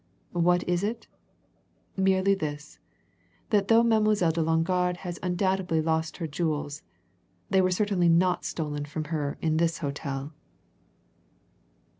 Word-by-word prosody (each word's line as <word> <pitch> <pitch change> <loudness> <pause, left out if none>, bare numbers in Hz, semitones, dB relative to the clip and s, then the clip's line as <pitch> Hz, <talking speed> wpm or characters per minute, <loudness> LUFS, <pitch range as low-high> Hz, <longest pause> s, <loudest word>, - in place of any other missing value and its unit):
What 175 0 +2
is 175 0 +1
it? 225 +3 -3 0.9
Merely 190 0 +3
this 150 -5 -5 0.7
that 200 -2 +3
though 230 0 +5
Mademoiselle 215 -6 +3
de 165 +1 -1
Longarde 175 +3 +1
has 175 -2 -6
undoubtedly 185 -2 0
lost 160 0 -1
her 170 - -3
jewels, 150 -2 -2 0.7
they 190 - +5
were 185 - +2
certainly 185 -2 +2
not 180 +2 +3
stolen 145 -2 -3
from 155 +2 -4
her 145 -2 -2
in 160 -1 +1
this 165 0 +1
hotel!" 140 0 -4
175 Hz, 125 wpm, -27 LUFS, 155-190 Hz, 0.9 s, though